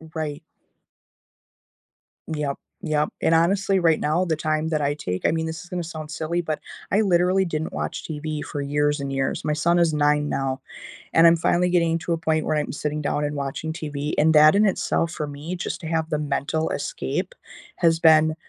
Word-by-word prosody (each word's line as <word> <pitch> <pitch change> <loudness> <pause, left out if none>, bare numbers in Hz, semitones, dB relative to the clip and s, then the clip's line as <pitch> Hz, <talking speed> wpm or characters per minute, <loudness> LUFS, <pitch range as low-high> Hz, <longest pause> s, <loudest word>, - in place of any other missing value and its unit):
Right. 150 -1 -3 1.9
Yep, 150 -3 -2 0.2
yep. 150 -2 0
And 165 - +3
honestly, 195 +3 +2
right 165 -2 +3
now, 165 +5 +1
the 160 -2 0
time 155 +1 -1
that 155 -2 0
I 145 0 +1
take 90 -10 -4
I - - +2
mean, 160 0 -1
this 160 +1 -5
is 175 - -15
gonna 180 -2 -3
sound 155 -2 -7
silly, 165 +3 -2
but 155 -2 -3 0.3
I 205 +3 +4
literally 185 0 +3
didn't 160 -2 -3
watch - - -4
TV 155 -1 -4
for 145 - -5
years 145 +1 0
and 140 0 -4
years. 135 0 -2
My 150 - +1
son 170 +3 +2
is 165 -2 +3
9 150 0 +2
now, 135 -1 -2 0.5
and 165 +1 +7
I'm 165 - +6
finally 180 +2 +2
getting 170 -2 +2
to 170 - -2
a - - 0
point 160 -1 0
where 155 - 0
I'm 150 - -2
sitting 150 +1 -3
down 150 0 -1
and 145 0 -2
watching 140 +3 -3
TV 150 -3 -4
and 160 +2 +4
that 155 +3 +7
in 210 +1 +4
itself, 170 -3 0
for 150 -3 -4
me, 145 +5 -6
just 175 - -4
to 160 - -6
have 160 0 -1
the 150 - 0
mental 150 +2 -1
escape, - - -3 0.4
has 165 -1 +3
been 155 -1 +5
155 Hz, 200 wpm, -23 LUFS, 150-170 Hz, 1.9 s, and